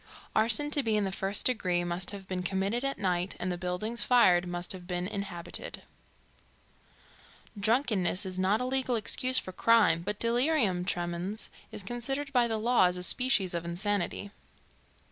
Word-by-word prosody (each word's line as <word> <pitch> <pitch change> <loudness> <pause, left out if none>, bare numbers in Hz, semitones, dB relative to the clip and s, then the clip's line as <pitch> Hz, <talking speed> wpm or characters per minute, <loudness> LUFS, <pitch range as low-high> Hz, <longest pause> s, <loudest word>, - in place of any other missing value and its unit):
Arson 230 +7 +3
to 290 - +2
be 220 -4 +1
in 210 - +1
the 195 - -2
first 195 +1 0
degree 185 -8 +1
must 175 +1 -1
have 200 -2 -5
been 185 -1 -3
committed 195 +6 -1
at 275 0 -2
night 180 -1 -1
and 185 - -2
the - - -2
buildings 185 +6 -3
fired 185 -8 +4
must 175 0 -3
have 180 -2 -7
been 180 -1 -2
inhabited. 190 -4 -6 1.8
Drunkenness 210 -4 +1
is 185 0 -4
not 195 +5 +2
a - - -1
legal 260 -1 0
excuse 255 +3 +2
for 185 - -1
crime, 210 -5 +3
but 205 +4 -4
delirium 235 - +1
tremens 175 +3 -3 0.2
is 205 - -7
considered 270 +6 -4
by 245 -2 +4
the 225 -1 -1
law 235 -1 +3
as 180 0 +1
a 180 - -1
species 205 -3 +3
of 170 -1 -2
insanity. 200 +3 -2
200 Hz, 165 wpm, -29 LUFS, 180-235 Hz, 1.8 s, fired